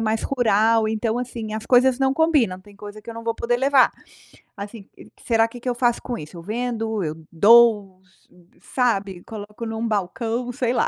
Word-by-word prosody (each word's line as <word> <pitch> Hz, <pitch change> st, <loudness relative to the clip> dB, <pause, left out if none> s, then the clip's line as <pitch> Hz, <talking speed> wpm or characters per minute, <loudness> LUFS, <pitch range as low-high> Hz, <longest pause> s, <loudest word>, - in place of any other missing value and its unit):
mais 220 Hz, 0 st, 0 dB
rural, 225 Hz, -3 st, +2 dB
então 220 Hz, +2 st, -1 dB
assim, 230 Hz, -3 st, -5 dB
as 220 Hz, 0 st, -5 dB
coisas 255 Hz, 0 st, +4 dB
não 265 Hz, 0 st, +1 dB
combinam, 280 Hz, -, +2 dB
tem 200 Hz, +1 st, -18 dB
coisa 210 Hz, +1 st, -10 dB
que 230 Hz, -, -9 dB
eu -, -, -9 dB
não 230 Hz, 0 st, -8 dB
vou 230 Hz, -1 st, -1 dB
poder 240 Hz, +1 st, -1 dB
levar. 270 Hz, 0 st, +4 dB, 0.7 s
Assim, 200 Hz, 0 st, -9 dB, 0.4 s
será 225 Hz, -1 st, +3 dB
que 240 Hz, +1 st, -11 dB
que 250 Hz, -, -9 dB
eu 245 Hz, -, +1 dB
faço 240 Hz, -1 st, +1 dB
com 245 Hz, -, -4 dB
isso? 150 Hz, +4 st, -10 dB
Eu 165 Hz, -, -10 dB
vendo, 225 Hz, -1 st, -3 dB
eu 155 Hz, 0 st, -3 dB, 0.2 s
doou, 205 Hz, 0 st, +5 dB
s 185 Hz, -1 st, -31 dB, 0.5 s
sabe, 200 Hz, -8 st, 0 dB
coloco 210 Hz, +1 st, -8 dB
em 225 Hz, -, -4 dB
um 225 Hz, +1 st, -2 dB
balcão, 225 Hz, +4 st, -2 dB
sei 245 Hz, -1 st, -1 dB
lá. -, -, +1 dB
225 Hz, 200 wpm, -22 LUFS, 205-245 Hz, 0.7 s, doou